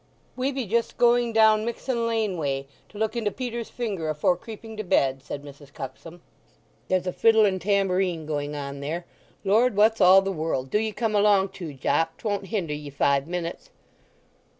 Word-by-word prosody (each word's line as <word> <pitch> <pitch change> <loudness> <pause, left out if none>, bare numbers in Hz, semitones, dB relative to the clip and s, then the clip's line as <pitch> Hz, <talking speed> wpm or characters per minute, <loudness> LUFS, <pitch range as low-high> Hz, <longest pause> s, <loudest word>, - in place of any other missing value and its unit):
"We 260 +2 -1
be 265 -3 -3
just 230 +3 -1
going 240 0 +3
down 220 -1 +5
Mixen 235 +1 -2
Lane 220 -4 0
way, 140 -4 -2 0.2
to 210 - -13
look 220 +1 -1
into 225 -3 0
Peter's 235 0 -5
Finger 200 -10 -3
afore 155 +4 +2
creeping 220 +3 -10
to 215 - -3
bed," 135 -7 +1
said 140 +1 -7
Mrs. 145 0 -13
Cuxsom. 165 +6 -9 0.7
"There's 185 -1 +1
a 180 - -2
fiddle 225 -1 +5
and 190 -2 0
tambourine 190 -4 +1
going 145 -1 -3
on 140 -1 -5
there. 160 +5 -4 0.4
Lord, 220 +4 +3
what's 215 +1 +4
all 190 +1 +7
the 195 - -1
world—do 155 -1 -1
ye 220 0 -1
come 225 0 -2
along 200 -2 +4
too, 175 -6 -8
Jopp—'twon't 190 - -1
hinder 185 -7 -2
ye 150 -1 -6
five 140 0 +1
minutes." 170 -1 -5
195 Hz, 175 wpm, -25 LUFS, 155-220 Hz, 0.7 s, all